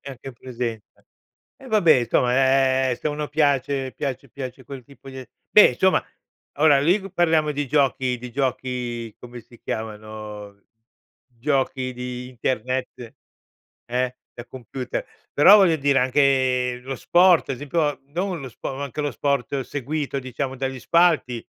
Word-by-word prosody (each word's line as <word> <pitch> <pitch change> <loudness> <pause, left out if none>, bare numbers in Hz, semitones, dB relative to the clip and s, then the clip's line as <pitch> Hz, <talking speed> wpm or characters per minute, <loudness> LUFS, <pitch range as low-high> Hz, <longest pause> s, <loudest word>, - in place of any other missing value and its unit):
E 140 - -9
anche 135 0 -10
in - - -8
presenza. 120 -3 -7 0.5
E 265 - -14
vabbè, 170 - +4
insomma, 125 +2 +1 0.6
ehm, 125 - 0
se 155 - -4
a - - 0
uno 150 0 -4
piace 140 -3 0
piace 135 -1 -4
piace 130 0 -8
quel 130 +1 -9
tipo 140 +2 -17
di 130 - -8
a 130 - -9 0.2
beh, 210 - +7
insomma, 190 +9 +2 0.5
ora 145 -2 +5
lì 190 +5 +1
parliamo 160 -4 +2
di 145 -1 -3
giochi 130 -2 +1
di 125 0 -9
giochi 125 -3 -3
come 120 0 -10
si 120 +1 -19
chiamano, 105 -2 -7 0.7
giochi 130 0 -2
di 125 0 -6
internet 130 -1 -3 0.7
eh? 125 +1 -2 0.2
Da 120 - -9
computer. 125 0 -6 0.3
Però 190 +9 +8
voglio 185 -5 +4
dire, 140 -2 +2
anche 130 -2 +2
lo 135 +1 -5
sport, 175 +5 +4
ad 135 - -1
esempio, 145 +2 -1
non 180 +4 -3
lo 135 - -7
spo 130 +3 -6
ma 140 - -5
anche 140 +2 -5
lo 145 -1 -1
sport 140 0 -1
seguito 145 +2 -3
diciamo 130 +1 -4
dagli 130 0 -4
spalti, 160 -8 +2
130 Hz, 155 wpm, -23 LUFS, 125-145 Hz, 0.7 s, Però